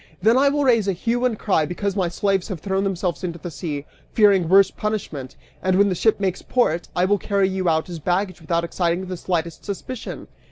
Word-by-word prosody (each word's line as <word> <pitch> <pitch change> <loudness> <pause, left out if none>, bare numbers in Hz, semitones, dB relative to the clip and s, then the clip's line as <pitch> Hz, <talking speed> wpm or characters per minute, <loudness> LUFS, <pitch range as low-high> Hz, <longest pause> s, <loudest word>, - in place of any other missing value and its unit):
Then 220 +5 +4
I 275 +2 +5
will 290 +1 0
raise 230 -6 +3
a 195 - +2
hue 240 +7 -1
and 235 -4 0
cry 185 -7 +1
because 195 +3 -2
my 190 -3 +1
slaves 195 +1 0
have 190 -6 -5
thrown 195 +2 -1
themselves 185 -4 -2
into 170 -2 -3
the 175 0 -7
sea, 145 -1 -5 0.3
fearing 200 -6 +4
worse 195 +1 +6
punishment; 160 -11 -4 0.3
and 185 0 +2
when 200 +1 +4
the - - +1
ship 215 +5 +2
makes 190 -2 -1
port, 175 -9 0
I 180 - +3
will 205 +1 +2
carry 200 -1 +1
you 190 -2 0
out 160 -1 +1
as 175 -2 -6
baggage 180 +2 -1
without 170 +1 0
exciting 170 +1 -1
the 185 0 -5
slightest 170 -2 -3
suspicion!" 220 +4 -6
190 Hz, 215 wpm, -22 LUFS, 170-205 Hz, 0.3 s, worse